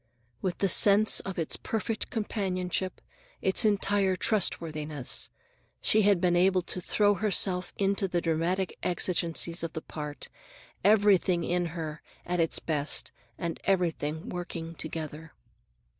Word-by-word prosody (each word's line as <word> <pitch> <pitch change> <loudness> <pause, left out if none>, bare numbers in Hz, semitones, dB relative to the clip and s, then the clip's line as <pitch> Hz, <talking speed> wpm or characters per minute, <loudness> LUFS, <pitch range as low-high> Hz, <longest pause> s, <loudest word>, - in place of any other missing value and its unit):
With 185 -2 -2
the 195 - +1
sense 205 +3 +6
of 190 - -6
its 165 -2 -1
perfect 220 0 -3
companionship, 185 -4 -2 0.4
its 190 - +2
entire 200 -2 +2
trustworthiness, 155 - -1 0.5
she 215 - +3
had 200 -3 +4
been 175 -1 +2
able 185 +1 +3
to 180 - -5
throw 205 +3 +2
herself 190 -2 +2
into 195 0 +1
the 175 -1 0
dramatic 170 +3 -1
exigencies 170 -1 0
of 165 -1 -4
the 160 - -5
part, 150 -3 -7 0.6
everything 195 -4 +4
in 175 +1 0
her 155 -2 -5 0.2
at 180 0 -2
its 165 -1 +1
best 150 -2 -1 0.3
and 170 -1 -4
everything 165 -4 -1
working 170 -2 -6
together. 160 -1 -7
180 Hz, 130 wpm, -28 LUFS, 165-195 Hz, 0.6 s, sense